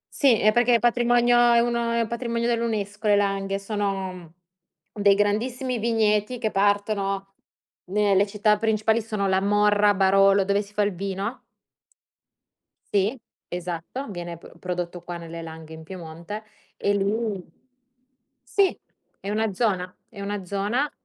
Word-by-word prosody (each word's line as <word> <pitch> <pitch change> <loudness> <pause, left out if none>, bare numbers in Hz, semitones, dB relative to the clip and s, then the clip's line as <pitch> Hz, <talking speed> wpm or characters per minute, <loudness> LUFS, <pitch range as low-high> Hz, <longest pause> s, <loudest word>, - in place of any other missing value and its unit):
Sì, 255 -7 +4
è 215 - +4
perché 240 +1 +4
è - - +3
patrimonio 240 0 +3 0.2
è 235 - +5
uno 235 0 0
è 235 -1 +1
patrimonio 235 0 -2
dell'UNESCO 220 -3 -1
le 205 - +5
langhe, 195 -1 0
sono 195 -4 -4 0.6
dei 200 -1 +4
grandissimi 240 +5 0
vigneti, 220 +1 +1
che 220 -2 -2
partono 195 -1 0 0.5
nelle 200 +1 +2
città 210 +1 +2
principali 220 0 +1
sono 210 -3 -2
La 190 0 +2
Morra, 205 0 +3
Barolo, 195 0 +4
dove 200 +1 +2
si 200 0 -12
fa 210 - +2
il 205 -1 0
vino. 195 +5 -4 1.5
Sì, 210 +6 +1 0.3
esatto, 175 +9 -5
viene 175 -2 -6
pr 170 - -16
prodotto 175 -1 -4
qua 175 0 -6
nelle 165 0 -8
langhe 160 -1 -9
in 160 - -9
Piemonte 170 +4 -8 0.3
e 205 - +1
lì 200 -1 -1 1.0
Sì, 400 -2 +2 0.4
è 195 - -6
una 220 0 0
zona, 185 -4 -1
è 205 -3 -10
una 200 -1 -4
zona 210 +9 -1
205 Hz, 140 wpm, -24 LUFS, 195-225 Hz, 1.5 s, è